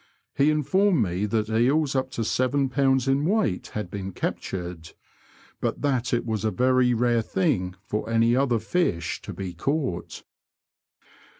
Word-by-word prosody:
He 140 Hz, +2 st, +3 dB
informed 165 Hz, -, +2 dB
me 95 Hz, +2 st, -1 dB
that 110 Hz, 0 st, 0 dB
eels 135 Hz, +6 st, +2 dB
up 130 Hz, 0 st, 0 dB
to 115 Hz, -, -2 dB
seven 130 Hz, +4 st, +1 dB
pounds 135 Hz, -1 st, +2 dB
in 135 Hz, +1 st, +2 dB
weight 175 Hz, -, 0 dB
had 105 Hz, -4 st, -4 dB
been 95 Hz, -1 st, -5 dB
captured, 90 Hz, -3 st, -5 dB, 0.7 s
but -, -, -2 dB
that 130 Hz, -4 st, 0 dB
it 120 Hz, -, 0 dB
was 110 Hz, -4 st, -2 dB
a 110 Hz, -, +2 dB
very 125 Hz, +1 st, +3 dB
rare 120 Hz, 0 st, +2 dB
thing 90 Hz, -3 st, 0 dB
for 105 Hz, +2 st, -3 dB
any 115 Hz, +1 st, +3 dB
other 130 Hz, -3 st, +2 dB
fish 110 Hz, -, -1 dB
to -, -, -7 dB
be 95 Hz, -2 st, -6 dB
caught. 130 Hz, -, -3 dB
120 Hz, 155 wpm, -25 LUFS, 100-135 Hz, 0.7 s, He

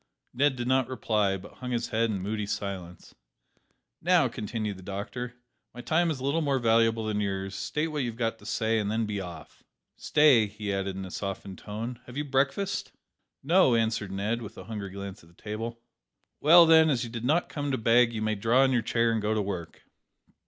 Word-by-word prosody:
Ned 135 Hz, +2 st, +2 dB
did 120 Hz, -1 st, -4 dB
not 130 Hz, -1 st, +2 dB
reply, 105 Hz, -6 st, 0 dB
but 95 Hz, +2 st, -12 dB
hung 125 Hz, -, -5 dB
his 120 Hz, -2 st, -2 dB
head 115 Hz, +1 st, +1 dB
in 100 Hz, -3 st, -2 dB
moody 105 Hz, 0 st, -2 dB
silence. 95 Hz, -4 st, -5 dB, 0.9 s
"Now," 175 Hz, -4 st, +4 dB
continued 110 Hz, -3 st, -4 dB
the -, -, -11 dB
doctor, 105 Hz, +6 st, -5 dB, 0.4 s
"my 120 Hz, -, -7 dB
time 170 Hz, +5 st, +2 dB
is 150 Hz, -5 st, -2 dB
a -, -, -7 dB
little 140 Hz, +4 st, +1 dB
more 140 Hz, -3 st, +1 dB
valuable 115 Hz, -1 st, +2 dB
than 105 Hz, -1 st, -1 dB
yours; 95 Hz, -1 st, -3 dB
state 150 Hz, +10 st, -2 dB
what 150 Hz, -1 st, -3 dB
you 125 Hz, -, -1 dB
have 115 Hz, -, -9 dB
got 115 Hz, -1 st, -1 dB
to -, -, -16 dB
say, 110 Hz, 0 st, +1 dB
and 105 Hz, -1 st, -1 dB
then 110 Hz, +1 st, 0 dB
be 105 Hz, -2 st, -3 dB
off. 90 Hz, -2 st, -10 dB, 0.4 s
Stay," 145 Hz, -8 st, +4 dB
he 105 Hz, 0 st, -4 dB
added, 95 Hz, -1 st, -2 dB
in 95 Hz, 0 st, -5 dB
a 95 Hz, -, -9 dB
softened 95 Hz, -1 st, -5 dB
tone, 115 Hz, +3 st, -6 dB
"have 125 Hz, +2 st, -9 dB
you 150 Hz, -, 0 dB
breakfasted?" 140 Hz, +8 st, -1 dB, 0.5 s
"No," 160 Hz, -4 st, +4 dB
answered 110 Hz, -3 st, 0 dB
Ned, 105 Hz, +5 st, -2 dB
with 110 Hz, 0 st, -9 dB
a -, -, -8 dB
hungry 105 Hz, -3 st, -6 dB
glance 100 Hz, +1 st, -8 dB
at 80 Hz, -, -19 dB
the 85 Hz, -, -24 dB
table. 115 Hz, +2 st, -5 dB, 0.6 s
"Well, 170 Hz, +3 st, +8 dB
then, 160 Hz, -1 st, +6 dB
as 130 Hz, -5 st, +1 dB
you 120 Hz, -, -5 dB
did 115 Hz, -1 st, -5 dB
not 155 Hz, +7 st, +2 dB
come 145 Hz, -1 st, -4 dB
to 130 Hz, -, 0 dB
beg, 115 Hz, +1 st, +4 dB
you 110 Hz, -2 st, -3 dB
may 110 Hz, 0 st, +1 dB
draw 115 Hz, +6 st, +3 dB
in 135 Hz, -, +3 dB
your 120 Hz, -2 st, +2 dB
chair 115 Hz, +1 st, +1 dB
and 115 Hz, -1 st, 0 dB
go 105 Hz, +1 st, 0 dB
to 105 Hz, -, +1 dB
work." 95 Hz, -4 st, -6 dB
115 Hz, 215 wpm, -28 LUFS, 105-130 Hz, 0.9 s, Well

